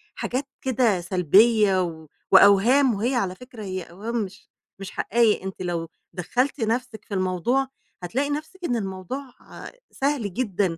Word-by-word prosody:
حاجات 265 +3 -3
كده 240 -7 +1
سلبية، 190 +3 +4
و 160 -2 -6 0.2
وأوهام، 220 +7 +6
وهي 235 +6 0
على 190 -6 -1
فكرة 245 -2 -11
هي 185 -2 -4
أوهام 205 +8 -6
مش 195 0 -11 0.3
مش 195 -1 -7
حقايق، 225 -3 +2
أنتِ 190 -1 -6
لو 170 -2 -2 0.3
دخَّلتِ 250 - -1
نفسِك 230 +1 -2
في - - -8
الموضوع، 190 +8 0 0.4
هتلاقي 265 +11 -1
نفسِك 315 +6 -5
إن 245 - 0
الموضوع 225 +6 -5 0.6
سهل 270 -8 -1
جدًا، 195 -6 -1
210 Hz, 140 wpm, -24 LUFS, 185-255 Hz, 0.6 s, وأوهام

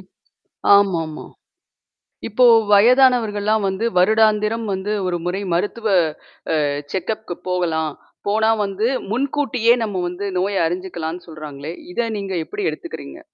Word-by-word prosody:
இப் - - -20 0.6
ஆமாம்மா. 170 -6 +1 1.0
இப்போ 235 +3 +3 0.3
வயதானவர்கள்லாம் 220 -2 +4
வந்து 190 +4 -2
வருடாந்திரம் 215 +3 +3
வந்து 190 +2 -3 0.2
ஒரு 175 -1 -1
முறை 180 +3 -2
மருத்துவ 210 +5 -1 0.8
அ - - +1 0.3
செக் 190 +2 -2
அப்க்கு 215 -5 -8
போகலாம். 165 -4 0 0.4
போனா 220 +2 +3
வந்து 200 +3 -1 0.2
முன்கூட்டியே 255 -2 +1
நம்ம 200 -4 -2
வந்து 180 +3 -5
நோயை 195 +2 0
அறிஞ்சுக்கலாம்ன்னு 175 -1 -5
சொல்றாங்களே, 155 -1 -8 0.2
இதை 235 +5 0
நீங்க 195 -1 -4
எப்படி 410 0 -5
எடுத்துக்குறீங்க? 340 - -8
200 Hz, 115 wpm, -20 LUFS, 180-225 Hz, 1.0 s, வயதானவர்கள்லாம்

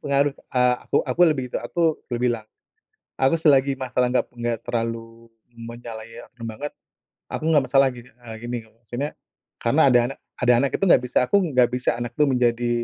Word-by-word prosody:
pengaruh, 140 0 +1 0.2
eee, 125 0 +4
aku - - -1
aku 175 - -3
lebih 130 -4 -1
itu, - - -2
aku 160 +6 0
dah 120 - -1
bilang. 120 -3 0 0.7
Aku 135 +5 +3
selagi 140 -3 +4
masalah 125 -1 0
nggak 125 - +2
nggak 120 -2 -2
terlalu 115 0 -4 0.2
menyalahikan 115 0 -10
banget, 140 +7 -6 0.6
aku - - -4
enggak 150 -4 +4
masalahin, 130 -3 +2
eee, 115 -1 -11
gini, 120 0 -3
maksudnya 120 +6 -6 0.5
karena 130 +7 +2
ada 125 - +6
anak - - -16 0.2
ada 125 0 +5
anak 135 +2 +1
itu - - 0
nggak 125 - +6
bisa 125 - +1
aku 200 - +2 0.2
nggak 125 -1 +5
bisa 125 0 0
anak 120 0 -5
itu 150 - +4
menjadi 120 -2 +1
125 Hz, 175 wpm, -23 LUFS, 115-135 Hz, 0.7 s, ada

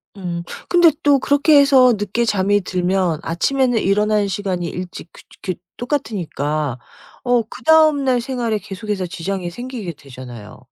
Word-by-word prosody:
음. 175 -3 -5 0.3
근데 345 -2 +6
또 290 -3 +4
그렇게 285 +2 +4
해서 265 -3 +6
늦게 205 +4 -1
잠이 205 -1 +2
들면 180 -2 0
아침에는 245 +8 +1
일어나는 210 +1 +1
시간이 185 -3 -3
일찍 180 -1 -7
그 - - -14 0.2
그 185 -3 -2 0.2
똑같으니까 155 - -2 0.5
어 245 -1 +3
그 - - -11
다음날 300 -6 +4
생활에 235 -4 -2
계속해서 195 0 -4
지장이 175 +1 -4
생기게 240 -3 -6
되잖아요. 125 -6 -11
205 Hz, 320 characters per minute, -19 LUFS, 175-255 Hz, 0.5 s, 근데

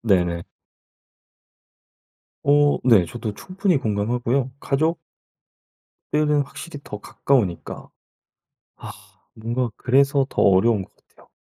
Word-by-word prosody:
네네. 90 -5 +1 2.0
어 145 0 +4
네. 110 -8 +6
저도 110 0 -5
충분히 185 - -1
공감하고요. 120 +4 -1
가족 160 +5 0 1.1
들은 150 -1 +2
확실히 145 +2 -9
더 105 - -7
가까우니까. 105 -12 -1 0.9
아 - - -9 0.4
뭔가 120 +2 -2
그래서 135 +2 +3
더 - - -1
어려운 100 +2 +4
것 - - -18
같아요. - - -26
125 Hz, 215 characters per minute, -22 LUFS, 105-145 Hz, 2.0 s, 네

